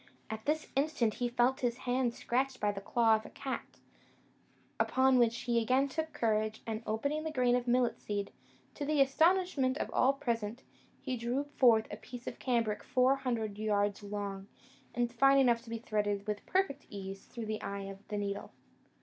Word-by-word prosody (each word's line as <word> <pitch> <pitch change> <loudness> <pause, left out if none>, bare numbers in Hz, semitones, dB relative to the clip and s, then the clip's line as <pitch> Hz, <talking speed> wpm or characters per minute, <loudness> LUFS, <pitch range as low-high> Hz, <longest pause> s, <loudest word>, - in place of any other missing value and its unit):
At 220 0 -6
this 310 +1 0
instant 275 -6 +1
he 245 +2 -1
felt 245 +2 +2
his 245 -1 0
hand 245 -1 +1
scratched 260 +1 -1
by 210 -1 +1
the 195 -1 -6
claw 225 +2 +3
of 215 - -9
a - - -10
cat; 270 -1 -6 1.0
upon 260 -1 +4
which 235 -1 +2
he 235 -1 +1
again 255 +5 +2
took 315 +3 -3
courage, 220 -5 0
and 220 -1 -3
opening 280 +8 -1
the 320 - -2
grain 250 -4 +3
of 250 0 -1
millet 245 0 +2
seed, 205 -1 -3 0.4
to - - -5
the 295 0 +1
astonishment 285 -1 +3
of - - -3
all 265 +2 +4
present, 235 -4 -3 0.4
he 260 -2 -2
drew 245 +4 -1
forth 245 -6 +4
a 205 - -5
piece 245 +2 -10
of - - -6
cambric 230 -4 0
four 255 +2 +3
hundred 225 -6 -2
yards 205 -1 +1
long, 200 -1 -5 0.5
and 240 -1 0
fine 275 +3 +5
enough 240 -4 +4
to 235 - -14
be 230 - -3
threaded 205 -3 -1
with 210 -1 -4
perfect 365 -7 0
ease 195 -1 -7
through 235 -2 -6
the 215 0 -3
eye 200 0 -4
of 195 0 -8
the 210 - -3
needle. 200 0 -3
240 Hz, 185 wpm, -32 LUFS, 215-265 Hz, 1.0 s, fine